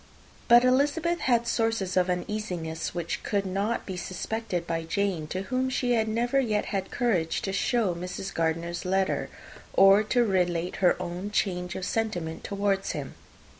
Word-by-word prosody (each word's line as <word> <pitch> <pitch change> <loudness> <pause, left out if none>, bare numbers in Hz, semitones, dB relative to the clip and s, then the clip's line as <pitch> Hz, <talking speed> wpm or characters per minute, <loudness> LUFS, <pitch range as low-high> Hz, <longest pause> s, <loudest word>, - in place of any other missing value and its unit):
But 240 0 +7
Elizabeth 295 +7 +2
had 235 -2 +2
sources 225 -5 0
of 185 0 +3
uneasiness 180 -4 -3
which 170 -1 -3
could 200 -2 -1
not 200 +5 -1
yet - - -22
be 190 -2 -5
suspected 185 0 -3
by 165 -1 -2
Jane, 180 -2 -1
to 185 +4 -3
whom 255 +4 -1
she 250 -1 +1
had 220 -2 +2
never 240 +5 +1
yet 215 -5 0
had 195 -1 -1
courage 195 -10 0
to 195 - -2
show 215 -2 +1
Mrs. 180 +2 -5
Gardiner's 165 +1 -1
letter, 190 +1 0 0.4
or 195 +1 +7
to 240 +3 +2
relate 180 -3 0
her 180 -2 +3
own 180 +2 -4
change 180 -3 -1
of 185 - -3
sentiment 180 -9 -2
towards 200 -1 -1
him. - - -5
195 Hz, 165 wpm, -27 LUFS, 180-225 Hz, 0.4 s, But